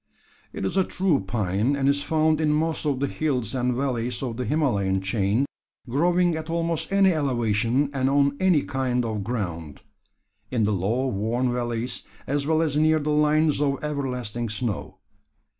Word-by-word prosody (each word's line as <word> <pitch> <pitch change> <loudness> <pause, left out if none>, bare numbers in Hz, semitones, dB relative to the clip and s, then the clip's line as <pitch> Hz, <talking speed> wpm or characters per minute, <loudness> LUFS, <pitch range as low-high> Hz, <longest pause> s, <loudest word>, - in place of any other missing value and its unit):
It - - -4
is - - -2
a 190 - +5
true 180 -5 +1
pine 105 +5 0
and 135 -1 0
is 140 0 +3
found 155 0 +1
in 155 -1 +2
most 160 +1 0
of 140 -3 0
the 140 - +1
hills 135 -7 -2
and 125 -1 0
valleys 125 -2 -2
of 120 -3 -3
the 125 +1 -3
Himalayan 105 -9 +1
chain, 100 +5 0 0.4
growing 175 +6 +2
at 160 0 -5
almost 165 0 -1
any 195 -2 +4
elevation 125 -1 +1
and 135 -1 +1
on 140 0 +3
any 180 -6 +3
kind 125 -2 -1
of 110 -3 -3
ground 85 - -4 0.7
in 120 -4 0
the 105 0 +2
low 105 +8 0
warm 120 +2 0
valleys, 120 0 -2 0.2
as 140 +1 -1
well 160 0 +3
as 150 -3 -1
near 155 +1 +4
the 150 0 -1
line 150 +1 +3
of 140 -1 0
everlasting 125 -6 -3
snow. 110 -2 -3
135 Hz, 170 wpm, -25 LUFS, 115-150 Hz, 0.7 s, a